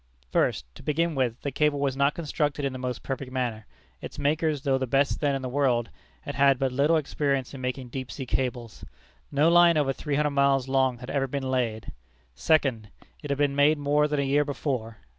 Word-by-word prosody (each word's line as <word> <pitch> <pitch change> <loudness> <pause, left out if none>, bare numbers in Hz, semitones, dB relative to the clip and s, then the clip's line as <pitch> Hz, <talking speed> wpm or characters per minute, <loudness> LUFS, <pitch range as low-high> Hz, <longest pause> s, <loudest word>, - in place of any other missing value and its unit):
1st. - - +1
To - - -13
begin 165 +3 0
with, 125 -4 -1
the 140 - -3
cable 150 +1 +1
was 140 -2 0
not 140 +2 +2
constructed 150 -3 -2
in 135 - -2
the 130 - -6
most 125 -1 -4
perfect 135 -1 -5
manner. 120 -5 -3 0.3
Its - - -8
makers, 150 -1 0
though 135 -1 +1
the 130 - -2
best 135 +3 +1
then 145 -2 +1
in 135 - -4
the - - -2
world, 125 -3 0 0.3
had - - -6
had 140 -1 +4
but 135 0 0
little 145 +5 +3
experience 140 -3 -1
in 135 - -8
making 125 0 -4
deep 130 0 -6
sea 135 - -6
cables. 125 -3 -3 0.5
No 145 +3 +3
line 170 -1 +6
over 140 -3 +1
three 145 +1 -3
hundred 150 0 +1
miles 140 -2 +2
long 130 -2 +1
had 125 +2 -8
ever 135 -1 0
been 135 0 -3
laid. 115 -4 -2 0.4
2d. 125 - +1 0.4
It 145 - -7
had 140 - 0
been 145 -1 +1
made 145 +2 +4
more 145 +1 +2
than 150 -1 -1
a - - +1
year 140 +2 +2
before. 130 -6 -3
140 Hz, 215 wpm, -26 LUFS, 130-145 Hz, 0.5 s, line